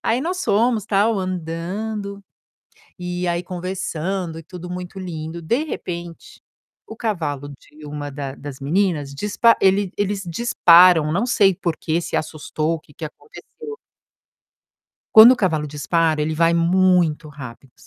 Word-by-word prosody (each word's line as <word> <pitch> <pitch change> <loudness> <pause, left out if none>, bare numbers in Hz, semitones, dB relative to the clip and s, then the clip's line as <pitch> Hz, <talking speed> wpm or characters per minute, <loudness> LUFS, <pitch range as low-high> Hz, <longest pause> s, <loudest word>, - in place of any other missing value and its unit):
aí 235 +3 +1
nós 360 +5 -3
fomos 225 0 +2
tal 210 +2 +2
andando, 190 +4 -4 0.8
e 180 0 -3
aí 170 0 0
conversando 180 -1 -4
e - - -12
tudo 180 +1 -9
muito 180 +1 -7
lindo, 165 -2 -6
de 235 - 0
repente, 170 - -7 0.4
o 220 - -10
cavalo 155 - -3
de 150 +2 -14
uma 145 0 -6
da 135 -1 -6
das 140 -2 -9
meninas, 150 -1 0
dispa 210 +6 +3
ele 195 0 +3
eles 205 -1 -1
disparam, 170 -5 +5
não 200 +8 0
sei 200 -6 +4
por 170 -3 -3
que 165 +2 -1
se - - -4
assustou, 155 +1 -2
o 165 - -4
que 145 - -22
que 160 - -7
aconteceu. 440 - -11 1.4
Quando 225 +3 +11
o - - 0
cavalo 160 -8 0
dispara, 155 +2 0
ele 155 +1 -1
vai 165 +1 +3
muito 170 -2 +2
rápido 135 -3 -11
175 Hz, 145 wpm, -21 LUFS, 155-200 Hz, 1.4 s, Quando